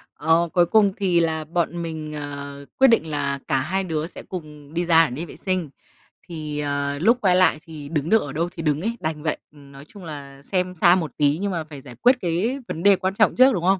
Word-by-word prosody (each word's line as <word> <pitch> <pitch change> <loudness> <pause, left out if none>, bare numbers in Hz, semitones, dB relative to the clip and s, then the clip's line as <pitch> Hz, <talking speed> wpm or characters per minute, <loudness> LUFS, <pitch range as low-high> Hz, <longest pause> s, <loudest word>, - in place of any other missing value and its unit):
Ờ, 165 +2 +2
cuối 175 -1 +4
cùng 205 +2 +4
thì 180 -4 +2
là 160 -1 0
bọn 170 +1 -2
mình, 160 -2 -5
ờ, 140 -1 -7
quyết 265 - +6
định 230 -9 +3
là 140 -2 -2
cả 135 - +1
hai 190 +7 -1
đứa 160 -3 -2
sẽ - - -10
cùng 150 -4 -9
đi 175 +1 -1
ra 165 -1 +6
để 125 - -6
đi 160 +5 -4
vệ - - -12
sinh, 185 -5 -2 0.6
thì, 155 -3 -5
ờ, 145 -1 -2
lúc 230 +8 +4
quay 185 -3 +4
lại 185 -4 +4
thì 150 -3 -9
đứng 155 0 -2
được 220 +1 +5
ở 140 - -6
đâu 170 +3 -1
thì 165 - -7
đứng 150 0 +1
ấy, 230 +3 -2
đành 155 -1 -4
vậy. 155 - -1
Ừm, 145 -2 -17
nói 140 +1 -12
chung 200 +4 -14
là 140 -4 -9
xem 180 +3 -2
xa 175 +1 +5
một 165 -6 -2
tí 145 +1 +2
nhưng 200 0 -1
mà 170 -3 -2
phải 150 -3 -11
giải 125 -3 -12
quyết 245 - +4
cái 190 +10 -1
vấn 165 - -5
đề 200 -1 +7
quan 190 +1 -2
trọng 215 0 +3
trước, 260 +1 +6
đúng 175 -5 -2
không? 190 +1 +3
165 Hz, 250 wpm, -23 LUFS, 145-185 Hz, 0.6 s, đề